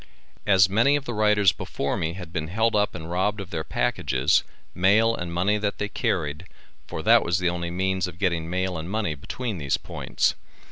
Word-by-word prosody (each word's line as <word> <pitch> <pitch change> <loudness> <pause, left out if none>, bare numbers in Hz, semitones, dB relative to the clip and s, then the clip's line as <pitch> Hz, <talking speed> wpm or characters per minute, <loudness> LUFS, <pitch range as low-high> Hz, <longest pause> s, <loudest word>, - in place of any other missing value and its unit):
As 95 -2 +6
many 115 +9 +3
of 145 -1 -2
the 120 - -4
riders 105 -2 +4
before - - -3
me 80 +1 -2
had 90 -3 -9
been 80 -3 -2
held 110 +6 +1
up 105 0 +1
and 80 +2 -7
robbed 105 +4 0
of 95 -1 -7
their 80 -1 -2
packages, - - +1 0.3
mail 110 +5 +3
and 85 -4 -5
money 95 +5 +1
that 100 -1 -2
they 105 - -3
carried, 80 -3 -2 0.4
for - - -5
that - - +6
was 85 +1 0
the 90 -1 +1
only 85 -1 -3
means 95 +1 -1
of 90 -1 -9
getting 85 -4 -1
mail 95 -1 -1
and 80 +2 -6
money 105 -5 -1
between 105 - -5
these 70 -2 0
points. - - -1
95 Hz, 200 wpm, -25 LUFS, 85-105 Hz, 0.4 s, As